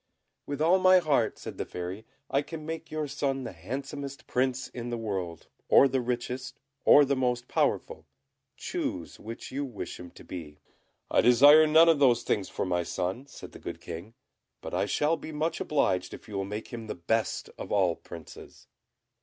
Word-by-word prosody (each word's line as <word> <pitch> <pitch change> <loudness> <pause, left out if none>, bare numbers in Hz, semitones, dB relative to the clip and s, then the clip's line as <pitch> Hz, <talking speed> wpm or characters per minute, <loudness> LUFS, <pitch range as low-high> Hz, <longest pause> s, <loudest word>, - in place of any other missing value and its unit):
"With 145 +1 -2
all 180 +4 +5
my 185 0 +7
heart," 145 -10 +2
said - - -8
the - - 0
Fairy; 90 +5 -6 0.2
"I 140 - +1
can 155 +1 -8
make 160 0 -5
your 155 -1 -2
son 135 -1 -2
the 120 - -5
handsomest 135 - -6
Prince 130 0 0
in 120 -1 -6
the 120 - -2
world, 95 -7 -4 0.2
or 140 - +7
the 130 -1 0
richest, 125 +2 -4 0.3
or 145 - +8
the 140 0 +1
most 125 -2 0
powerful; - - -1 0.5
choose - - -4
which 115 +2 -8
you 140 +2 -2
wish 125 -7 -6
him 90 - -9
to - - -15
be." 80 -5 -8 0.5
"I - - +5
desire 145 +6 +8
none 160 +2 +7
of 165 -3 +5
those 120 -4 +4
things 100 -2 -1
for - - -2
my 90 -1 +1
son," 95 +9 -3
said - - -11
the - - -12
good - - -6
King; 85 +7 -8 0.4
"but - - -8
I - - +1
shall 155 +3 +1
be 160 - -8
much 155 +2 -1
obliged 95 -11 0
if - - -15
you 105 - -10
will 95 0 -1
make 105 +3 -6
him 115 -2 -7
the - - -4
best 110 +6 -1
of - - -6
all 95 -5 +3
Princes. 85 -3 -12
125 Hz, 190 wpm, -28 LUFS, 100-145 Hz, 0.5 s, or